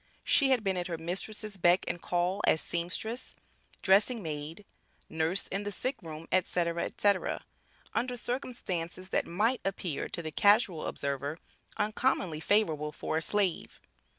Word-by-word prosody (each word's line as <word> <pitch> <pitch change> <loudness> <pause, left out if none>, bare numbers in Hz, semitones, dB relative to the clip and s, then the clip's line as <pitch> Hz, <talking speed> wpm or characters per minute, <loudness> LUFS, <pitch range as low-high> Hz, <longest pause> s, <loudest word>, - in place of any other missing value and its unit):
She 285 -6 +4
had 255 -4 +3
been 190 -2 0
at 175 - -1
her 170 -2 -3
mistress' 195 +5 -3
beck 175 +1 +4
and 175 - -2
call 180 +3 0
as 160 - +5
seamstress, 180 +10 -3 0.5
dressing 205 +3 +4
maid, 155 +5 -5 0.4
nurse 160 +4 0
in 195 - -3
the 205 - -3
sickroom, 165 - -4
etc., 170 -2 +1
etc., 200 -2 +1 0.5
under 245 +1 -1
circumstances 185 -8 -3
that - - +1
might 220 +9 +1
appear 185 -5 -2
to 170 - -4
the 155 - -4
casual 205 -5 +4
observer 140 +2 -2 0.4
uncommonly 210 -6 +1
favorable 160 -6 +2
for 155 - -2
a - - 0
slave. 195 0 0
185 Hz, 140 wpm, -31 LUFS, 165-210 Hz, 0.5 s, as